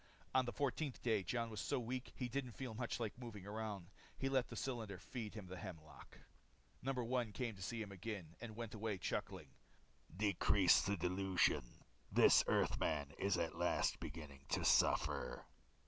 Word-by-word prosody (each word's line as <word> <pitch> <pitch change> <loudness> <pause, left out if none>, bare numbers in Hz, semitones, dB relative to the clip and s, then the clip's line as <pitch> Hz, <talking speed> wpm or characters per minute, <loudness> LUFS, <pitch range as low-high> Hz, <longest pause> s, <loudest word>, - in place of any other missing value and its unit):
On 130 -1 +4
the 120 - -2
fourteenth 140 +1 -1
day, 110 -4 +3
Jon 115 +5 -1
was 105 - -3
so - - 0
weak 125 +2 -3
he 125 - -2
didn't 125 -1 -3
feel 130 -2 -5
much 120 +2 -2
like 115 0 -3
moving 110 -6 -7
around. 105 -3 -4 0.3
He 135 - 0
let 130 -2 +2
the - - -6
cylinder 115 -7 -3
feed 110 +2 -6
him 105 -3 -6
the 90 +1 -7
hemlock. 80 -6 -9 0.6
No. 135 - 0
1 125 -2 0
came 125 0 -1
again 110 - -8
to 95 - -12
see 115 +4 -2
him, 100 - -9 0.5
and 115 -3 -6
went 115 -1 -5
away 110 -2 -2
chuckling, - - -3 0.7
"Decrease 100 -2 +5
the 100 0 0
dilution. 90 -7 +1 0.3
This - - +7
Earthman 70 -3 +1
at 90 -4 +1
last - - +2
is - - -13
beginning 70 -3 -8
to - - +1
suffer." - - +3
110 Hz, 170 wpm, -40 LUFS, 95-120 Hz, 0.7 s, This